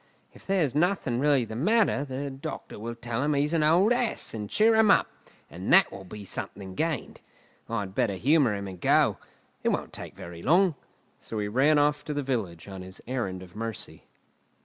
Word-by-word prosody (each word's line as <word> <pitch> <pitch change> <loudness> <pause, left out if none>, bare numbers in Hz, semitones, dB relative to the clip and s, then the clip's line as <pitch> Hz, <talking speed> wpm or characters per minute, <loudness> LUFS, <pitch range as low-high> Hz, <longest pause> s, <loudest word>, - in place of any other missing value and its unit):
If - - -18
there's 180 -9 +1
nothing 155 -6 +1
really 140 -3 +3
the 110 - -7
matter, 200 - +2
the 140 0 -4
doctor 135 -5 -7
will 115 +2 -5
tell 115 0 -3
him 150 +1 +1
he's 145 +3 +1
an 165 - +2
old 175 +9 +4
ass, 245 -2 -1
and 105 -2 -5
cheer 225 +1 +4
him 220 -1 +5
up; - - +5 0.4
and 90 +6 -5
that 190 +1 +6
will 95 -1 -9
be 100 +3 -9
something 95 0 -6
gained. 160 - -3 0.5
I'd 105 -4 -3
better 110 -3 0
humour 135 - +3
him 100 0 -5
and 90 -2 -9
go; - - +3 0.4
it - - +1
won't - - -2
take - - -9
very 85 -1 -9
long." 175 - +4 0.5
So 110 - -6
he 105 -1 -1
ran 135 +8 +3
off 145 0 +2
to 150 - -4
the 145 - -1
village 105 -11 -3
on 95 -1 -8
his 95 0 -10
errand 105 -8 -3
of 90 -2 -15
mercy. 115 0 -6
130 Hz, 195 wpm, -27 LUFS, 105-155 Hz, 0.5 s, that